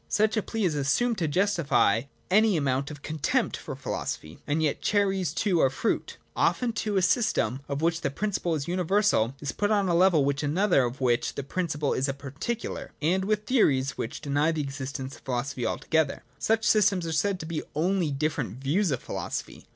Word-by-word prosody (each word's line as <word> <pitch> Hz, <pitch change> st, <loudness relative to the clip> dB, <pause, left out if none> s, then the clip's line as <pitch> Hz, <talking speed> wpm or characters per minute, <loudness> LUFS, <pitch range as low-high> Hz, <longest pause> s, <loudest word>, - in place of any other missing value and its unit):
Such 215 Hz, +1 st, +2 dB
a 215 Hz, -, +2 dB
plea 225 Hz, +1 st, -3 dB
is 170 Hz, -, +1 dB
assumed 170 Hz, -, +1 dB
to 165 Hz, -, +1 dB
justify 150 Hz, -, +2 dB, 0.3 s
any 210 Hz, -1 st, +4 dB
amount 140 Hz, -2 st, 0 dB
of 145 Hz, -1 st, -10 dB
contempt 155 Hz, -2 st, 0 dB
for -, -, -7 dB
philosophy. 75 Hz, +1 st, -5 dB
And 155 Hz, +2 st, +1 dB
yet 150 Hz, -, 0 dB
cherries 195 Hz, -4 st, +1 dB
too 190 Hz, -6 st, +1 dB
are 135 Hz, -, +5 dB
fruit. 135 Hz, -, -2 dB, 0.2 s
Often, 245 Hz, -2 st, +1 dB
too, 210 Hz, -2 st, -1 dB
a 190 Hz, -, +2 dB
system, 180 Hz, -, +1 dB
of 140 Hz, +2 st, -2 dB
which 165 Hz, 0 st, +1 dB
the 140 Hz, -, 0 dB
prin 205 Hz, +10 st, -2 dB
ciple 170 Hz, -4 st, -1 dB
is 140 Hz, -, -4 dB
the 170 Hz, -, -4 dB
universal, 180 Hz, -, +2 dB
is 140 Hz, -2 st, -2 dB
put 205 Hz, -, -1 dB
on 205 Hz, -3 st, +2 dB
a 175 Hz, -, +1 dB
level 170 Hz, -4 st, +4 dB
with 140 Hz, 0 st, 0 dB
another 155 Hz, -1 st, +2 dB
of 120 Hz, +3 st, -5 dB
which 120 Hz, -2 st, +1 dB
the 140 Hz, -, -3 dB
principle 150 Hz, -2 st, -1 dB
is 135 Hz, +2 st, 0 dB
a 135 Hz, -, -2 dB
particular, 140 Hz, -, -5 dB
and 185 Hz, +5 st, +1 dB
with 215 Hz, +1 st, 0 dB
theories 135 Hz, -, +3 dB
which 115 Hz, -, -5 dB
deny 145 Hz, +3 st, +1 dB
the 160 Hz, -2 st, -1 dB
existence 135 Hz, -1 st, -5 dB
of -, -, -20 dB
philosophy 125 Hz, -1 st, -2 dB
altogether. 160 Hz, +4 st, 0 dB, 0.2 s
Such 225 Hz, 0 st, +1 dB
systems 195 Hz, -4 st, +3 dB
are 165 Hz, -, -3 dB
said 190 Hz, +4 st, +1 dB
to 160 Hz, -, -6 dB
be 160 Hz, -1 st, -3 dB
only 175 Hz, +1 st, +1 dB
different 140 Hz, -6 st, -2 dB
views 160 Hz, +9 st, +1 dB
of 130 Hz, -4 st, -2 dB
philosophy. -, -, -5 dB
160 Hz, 200 wpm, -27 LUFS, 140-195 Hz, 0.3 s, are